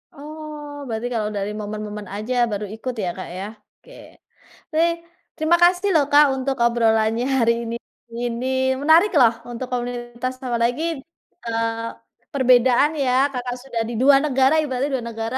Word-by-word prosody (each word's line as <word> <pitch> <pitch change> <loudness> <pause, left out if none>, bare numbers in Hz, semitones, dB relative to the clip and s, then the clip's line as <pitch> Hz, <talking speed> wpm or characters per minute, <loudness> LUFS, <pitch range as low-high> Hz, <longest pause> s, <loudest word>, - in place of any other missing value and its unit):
Oh, 300 0 -9 0.2
berarti 225 +1 -3
kalau 215 -2 -1
dari 200 +1 -2
momen-momen 210 -1 -6
aja 215 +5 -3 0.2
baru 205 0 -3
ikut, 250 +3 -5
ya, 180 - -1
Kak, 185 - -7
ya, 195 - -4 0.3
oke. - - -18 0.8
Baik, 335 +1 +2 0.4
terima 325 +2 +3
kasih, 360 +3 +4
loh, 300 -3 +4
Kak, 295 +1 +7
untuk 265 +1 -2
obrolannya 225 0 +2
hari 230 -1 +4 0.7
ini, 240 +1 -3 0.4
menarik 325 +7 +5
loh, 235 -3 +6 0.2
untuk 250 +2 -5
komunitas, 240 0 -4
apalagi, 245 +3 0 0.6
eee, 230 0 -2 0.5
perbedaan 255 +2 +4
ya, 260 -3 +1 0.2
Kakak 245 -1 -3
sudah 235 -4 -3
di 240 - -4
2 275 +1 +7
negara, 270 +2 +3
ibaratnya 275 -1 -2
2 235 - -6
negara, 225 +2 -4
245 Hz, 145 wpm, -22 LUFS, 230-285 Hz, 0.8 s, Kak